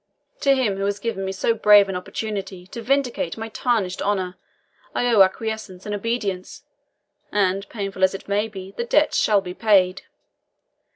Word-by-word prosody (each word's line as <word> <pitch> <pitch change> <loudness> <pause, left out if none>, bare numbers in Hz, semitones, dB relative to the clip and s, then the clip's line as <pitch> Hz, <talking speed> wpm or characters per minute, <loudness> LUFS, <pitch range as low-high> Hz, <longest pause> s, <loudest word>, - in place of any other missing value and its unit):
To 275 -2 +4
him 225 -7 0
who 195 - -1
has 200 0 -1
given 205 -2 -3
me 190 - -2
so 195 +4 +1
brave 210 -2 +6
an 190 - -4
opportunity 195 -1 -5
to 230 +5 -8
vindicate 275 +1 0
my 225 0 -5
tarnished 215 -6 -1
honour, 190 -3 -1 0.6
I - - +1
owe 230 -4 +5
acquiescence 195 -1 0
and 210 - -3
obedience; 205 -3 -3 0.7
and 195 0 0
painful 195 -3 -4
as 190 +1 +4
it 195 - -9
may 205 +2 +1
be, 195 -3 -9
the 235 - -4
debt 300 +6 +2
shall 205 -2 +3
be 180 -1 -7
paid. 195 -3 +3
200 Hz, 170 wpm, -23 LUFS, 190-225 Hz, 0.7 s, brave